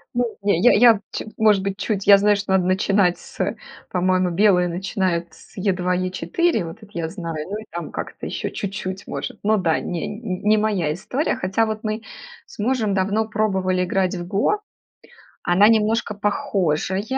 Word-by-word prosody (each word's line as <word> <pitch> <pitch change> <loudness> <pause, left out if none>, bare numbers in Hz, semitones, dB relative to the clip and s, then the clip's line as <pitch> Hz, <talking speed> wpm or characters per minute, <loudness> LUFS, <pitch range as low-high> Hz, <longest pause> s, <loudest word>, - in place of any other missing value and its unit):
Ну, 240 -2 -1
не, 200 -4 +2
я 245 - +6
я 230 -1 +6
ч - - -4
может 210 -3 +4
быть, 195 0 -3
чуть, 200 -3 -2
я 200 -1 +9
знаю, 205 +1 +3
что 200 -1 -4
надо 190 -2 +3
начинать 185 0 +2
с, - - -4 0.4
по-моему, 185 0 +1
белые 180 -1 +4
начинают 175 -1 -1
с - - -18
E2-E4, 185 - 0
вот 165 +3 -8
это 215 - -14
я 165 -1 -1
знаю. 165 -3 -6
Ну, 205 +3 -4
и 220 - -10
там 170 0 -6
как-то - - -6
еще - - -3
чуть-чуть, 190 -1 -5
может. - - -5
Ну 215 +1 +3
да, 165 -5 +1
не 175 -2 -4
не 210 -1 0
моя 205 -8 0
история, 250 - -2
хотя 190 +5 0
вот 220 0 -3
мы 215 0 -2 0.5
с - - -15
мужем 215 -2 0
давно 205 +3 +1
пробовали 190 -4 0
играть 185 +1 0
в 175 -1 -5
"Го". 210 - +1 0.8
Она 185 +3 +4
немножко 220 -1 +2
похожая, 195 -3 -1
195 Hz, 170 wpm, -22 LUFS, 180-215 Hz, 0.8 s, я